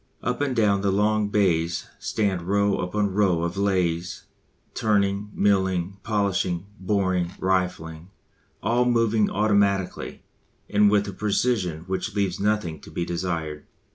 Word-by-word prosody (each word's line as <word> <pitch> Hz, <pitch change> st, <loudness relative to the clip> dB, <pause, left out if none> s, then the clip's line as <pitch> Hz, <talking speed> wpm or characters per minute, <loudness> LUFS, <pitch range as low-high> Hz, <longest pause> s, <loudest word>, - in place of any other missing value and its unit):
Up 125 Hz, -, -1 dB
and 140 Hz, -3 st, 0 dB
down 100 Hz, -4 st, +3 dB
the 100 Hz, -, +1 dB
long 105 Hz, +1 st, +2 dB
bays 85 Hz, -5 st, +1 dB
stand 100 Hz, -4 st, -1 dB
row 100 Hz, 0 st, +2 dB
upon 100 Hz, +2 st, -1 dB
row 95 Hz, -5 st, +2 dB
of 85 Hz, +1 st, -2 dB
lathes, 90 Hz, -3 st, -1 dB, 0.5 s
turning, 100 Hz, -1 st, +1 dB
milling, 95 Hz, -2 st, +1 dB
polishing, 100 Hz, -4 st, -1 dB
boring, 95 Hz, -2 st, 0 dB
rifling 90 Hz, -3 st, -1 dB, 0.5 s
all 120 Hz, +4 st, +2 dB
moving 115 Hz, -3 st, +2 dB
automatically, 100 Hz, -2 st, 0 dB, 0.4 s
and 105 Hz, 0 st, +4 dB
with 100 Hz, 0 st, +2 dB
a 100 Hz, -, -5 dB
precision 100 Hz, -4 st, 0 dB
which 95 Hz, +3 st, -4 dB
leaves 95 Hz, -3 st, 0 dB
nothing 105 Hz, -6 st, 0 dB
to -, -, -13 dB
be 85 Hz, -, -3 dB
desired. 85 Hz, -4 st, -3 dB
100 Hz, 130 wpm, -24 LUFS, 90-105 Hz, 0.5 s, and